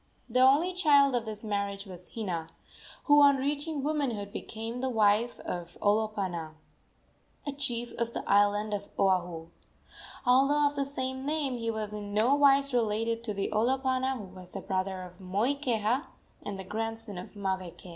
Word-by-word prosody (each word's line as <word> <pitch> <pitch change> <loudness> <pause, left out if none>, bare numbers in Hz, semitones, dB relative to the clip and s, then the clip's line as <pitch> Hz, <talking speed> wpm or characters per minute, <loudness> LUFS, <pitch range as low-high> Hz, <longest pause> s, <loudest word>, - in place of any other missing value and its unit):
The 250 +1 +1
only 285 +8 +5
child 285 -6 +5
of 240 -2 0
this 215 0 -6
marriage 200 -1 -2
was 180 -2 -11
Hina, 180 -8 -3 0.6
who 290 0 +6
on 280 -1 +7
reaching 290 +2 -2
womanhood 260 -10 -1
became 225 +2 -5
the 265 - 0
wife 220 +1 +2
of 175 -1 -6
Olopana, 200 -7 0 0.9
a 285 - -2
chief 240 -4 -3
of 235 0 -1
the - - -5
island 205 +1 +3
of 200 0 -4
Oahu. 175 -4 +1 0.8
Although 275 +4 +4
of 290 0 +1
the 280 -1 0
same 260 -1 -3
name, 290 -3 0
he 230 0 -2
was 215 -2 -3
in 205 -1 -5
nowise 275 +4 +4
related 230 0 0
to 210 -3 -3
the 195 - -2
Olopana 260 +3 +1
who 215 - -7
was 185 -1 -12
the 195 - -4
brother 185 0 -2
of 180 0 -12
Moikeha 230 - 0 0.4
and 195 -2 -6
grandson 225 -2 -4
of 180 - -10
Maweke. 185 -3 -4
225 Hz, 155 wpm, -29 LUFS, 200-265 Hz, 0.9 s, on